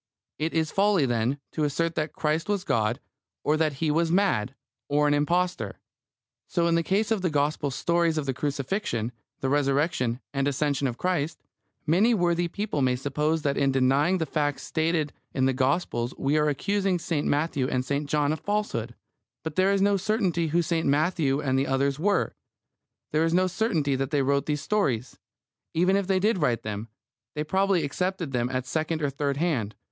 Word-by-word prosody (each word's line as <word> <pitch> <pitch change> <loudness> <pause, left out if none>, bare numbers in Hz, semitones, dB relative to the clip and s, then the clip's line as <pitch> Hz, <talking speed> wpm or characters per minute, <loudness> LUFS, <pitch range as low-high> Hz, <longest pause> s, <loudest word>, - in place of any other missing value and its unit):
It 160 +2 -1
is 160 -1 +1
folly, 195 -6 +3
then, 120 +2 0
to 155 - -2
assert 165 +3 0
that 155 -1 -2
Christ 155 +4 -1
was 200 -3 0
God, 115 -3 0 0.4
or 150 - +2
that 155 -1 +1
He 150 +3 0
was 165 +2 +1
mad, 155 - +1 0.3
or 150 +1 +3
an 145 - +3
impostor. 175 +5 0 0.7
So 170 -2 0
in 170 - +2
the 170 - +3
case 205 +6 0
of 220 -4 +1
the 180 - +1
Gospel 145 0 0
stories 170 +4 +1
of 150 - -1
the 135 - -1
Crucifixion, 135 - -2 0.3
the 135 - 0
Resurrection, 140 -3 +1
and 140 0 0
Ascension 140 0 0
of 120 -2 -4
Christ. 175 -4 -1 0.4
Many 200 +10 +4
worthy 175 -2 +1
people 200 -4 -3
may 130 -1 +2
suppose 150 +4 -1
that 140 -1 0
in 140 -1 +3
denying 135 +7 +3
the 165 - -1
facts 145 -1 -1
stated 160 -2 0 0.2
in 130 -1 +2
the 135 - +2
Gospels 130 -2 0
we 140 +2 0
are 150 0 +3
accusing 195 +5 0
St. 165 -3 -2
Matthew 145 -3 0
and 130 -1 -1
St. 140 +1 -2
John 150 0 +2
of 155 - -4
falsehood. 200 - -2 0.5
But 160 -1 -5
there 190 +1 +3
is 195 -1 +2
no 200 0 +3
certainty 185 -4 0
who 170 +3 +2
St. 165 0 0
Matthew 145 -1 +2
and 135 -2 +1
the 135 - 0
others 135 +1 0
were. 200 +4 +1 0.8
There 155 +1 +2
is 165 +1 +2
no 185 +1 +4
certainty 180 - 0
that 135 0 -2
they 145 -2 +1
wrote 140 +1 +1
these 150 -1 -1
stories. 135 - -1 0.6
Even 180 +4 +3
if 200 -2 0
they 190 -1 +2
did 205 +1 +2
write 125 -7 +1
them, 105 +1 -4 0.5
they 150 - -1
probably 190 +1 +1
accepted 180 +1 -2
them 125 -1 0
at 130 -1 -2
second 155 +2 -2
or 140 - +1
third 140 0 -1
hand. 130 -11 -1
150 Hz, 190 wpm, -26 LUFS, 135-175 Hz, 0.8 s, Many